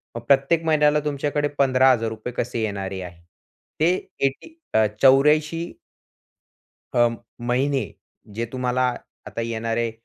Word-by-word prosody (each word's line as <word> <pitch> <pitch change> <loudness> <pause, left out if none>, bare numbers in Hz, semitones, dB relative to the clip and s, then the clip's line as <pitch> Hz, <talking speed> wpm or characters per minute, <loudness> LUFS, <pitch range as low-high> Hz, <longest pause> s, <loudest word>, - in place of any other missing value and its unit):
मग 120 - -5
प्रत्येक 140 +5 +3
महिन्याला 150 -1 +3
तुमच्याकडे 145 0 -1
₹15000 125 -4 +2
कसे 120 -1 -3
येणारे 95 -3 -4
आहेत? 85 -1 -10 0.6
ते 160 - +4 0.4
80 135 0 -1 0.3
अ, 110 0 +4 0.2
84 150 +4 +5 1.4
अं, 120 -1 +3 0.3
महिने, 130 -2 0 0.4
जे 115 +1 -2
तुम्हाला 125 0 0 0.4
आता 115 - -5
येणारे 115 0 -2
125 Hz, 110 wpm, -23 LUFS, 115-140 Hz, 1.4 s, 84